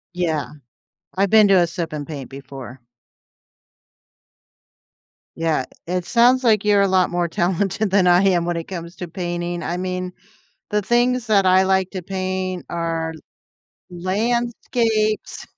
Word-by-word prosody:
Yeah. 160 -5 -1 0.7
I've 195 0 +2
been 215 -2 +6
to 195 - +5
a 175 -2 +5
sip 165 -1 -5
and 145 -2 -5
paint 140 -5 -7
before. 135 -2 -10 2.6
Yeah. 160 -5 0 0.2
It 180 0 -2
sounds 245 +4 +4
like 215 -4 +3
you're 205 -1 +4
a 200 - +3
lot 185 -1 +2
more 175 -1 0
talented 190 +3 -1
than 190 -2 +4
I 180 +2 +5
am 175 -3 +2
when 175 - -1
it 165 - -4
comes 170 -1 -7
to 180 - -6
painting. 175 -1 -4
I 175 - -2
mean, 185 0 -4 0.6
the 210 0 +1
things 240 +2 +2
that 200 -3 +3
I 185 +1 +5
like 190 -1 +1
to 185 -2 -5
paint 185 -1 -3
are 165 -1 -2 0.8
landscapes 220 +3 -1
185 Hz, 145 wpm, -21 LUFS, 170-205 Hz, 2.6 s, been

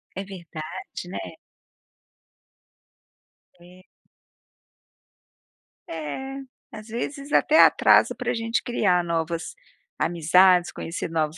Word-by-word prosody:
É 195 - -4
verdade, 175 -1 -8
né. 185 - -5 2.4
É. 180 +1 -17 2.0
É, 215 - -6 0.3
às 215 +1 -10
vezes 275 +5 -5
até 315 +1 +4
atrasa - - +5
pra - - -2
gente 230 0 -1
criar 185 -7 +1
novas 165 0 -3 0.5
amizades, 175 +2 +4
conhecer 165 0 -5
novos 160 -1 -1
180 Hz, 85 wpm, -24 LUFS, 165-220 Hz, 2.4 s, atrasa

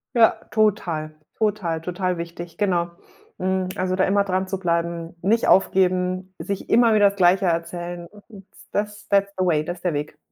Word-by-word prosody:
Ja, 230 -2 +6 0.2
total, 175 -8 0 0.2
total, 195 -7 -1
total 180 +1 -2
wichtig, 170 0 -7
genau. 175 -4 +1 0.5
Hm, 185 0 -1
also 185 -1 -1
da 190 - +2
immer 200 +1 +2
dranzubleiben, 175 -3 -2
nicht 220 +5 +2
aufgeben, 185 0 +2
sich 200 -1 -4
immer 230 -1 +5
wieder 205 -1 +6
das - - -13
Gleiche 190 +1 +4
erzählen 175 +1 -3
und 205 0 -16 0.2
das 210 0 -3
that's 200 0 +3
the 185 - +1
way, 155 -4 +2
das 175 +3 -5
ist 175 - -19
der 175 -4 0
Weg. 150 +1 -4
185 Hz, 165 wpm, -23 LUFS, 170-200 Hz, 0.5 s, Ja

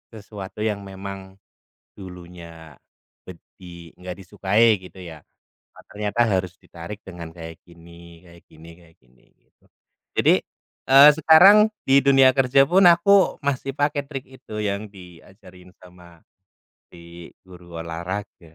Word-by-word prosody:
sesuatu 105 0 -9
yang 105 -2 -2
memang 95 0 -10 0.6
dulunya 85 -3 -13 0.6
bed 90 - -10 0.2
di 85 -2 -13
nggak 90 0 -9
disukai, 100 +3 0
gitu 95 +1 -15
ya. 80 -3 -11 0.5
Nah, - - -17
ternyata 105 +2 -4
harus 95 -2 -2
ditarik 85 +5 -11
dengan 85 -3 -10
kayak 80 -1 -11
gini 85 -1 -17
kayak 85 0 -18
gini 80 +1 -16
kayak 85 -2 -23
gini, 60 -1 -30
gitu. - - -41 0.6
Jadi, - - +4 0.6
eee, 140 +2 +8
sekarang, 195 +7 +6 0.2
di 135 +1 +4
dunia 135 -1 +5
kerja 135 +1 +3
pun, 190 +2 +3
aku 185 +3 +3
masih 135 -1 -3
pakai 145 0 -1
trik 135 -2 -8
itu, 130 -5 -11
yang 100 +1 -4
diajarin 90 0 -17
sama 90 -2 -18 0.7
di 85 0 -14 0.2
guru 90 -2 -13
olahraga. 85 0 -8
95 Hz, 130 wpm, -21 LUFS, 85-115 Hz, 0.7 s, eee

